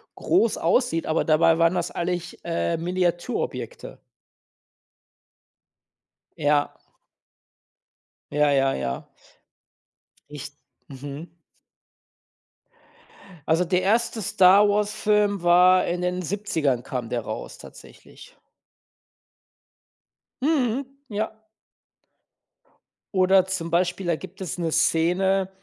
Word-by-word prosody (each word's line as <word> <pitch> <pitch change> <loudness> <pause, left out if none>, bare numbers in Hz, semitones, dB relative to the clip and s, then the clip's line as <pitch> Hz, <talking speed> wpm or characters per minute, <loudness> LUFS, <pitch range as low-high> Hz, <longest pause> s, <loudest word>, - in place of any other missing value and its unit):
groß 235 - +1
aussieht, 170 -1 +1
aber 160 - 0
dabei 165 +1 +4
waren 165 +1 +4
das 175 -1 -2
eigentlich, 175 0 -4
äh, 170 0 -1
Miniaturobjekte. 180 - -3 2.4
Ja. 145 -2 +2 1.6
Ja, 150 0 +2
ja, 135 -1 +2
ja. 65 -1 -4 1.2
Richt 145 -1 -9 0.3
mhm. 140 +4 -8 2.2
Also 165 +3 +2
der 180 +1 +1
1. 225 +3 0
Star-Wars-Film 205 +1 +3
war 180 +1 +5
in 175 +1 -2
den 180 0 -1
70ern 160 - -1
kam 125 -2 -5
der 120 - -2
raus - - -7
tatsächlich. - - -15 2.1
Mhm, 270 -3 +1 0.2
ja. 215 +1 -4 1.7
Oder 185 0 +4
zum 170 -3 -4
Beispiel, 180 +2 0
da 170 -1 +1
gibt 185 +3 -11
es 180 -3 -4
'ne 165 -2 -1
Szene, 180 +4 +2
180 Hz, 85 wpm, -24 LUFS, 160-200 Hz, 2.4 s, war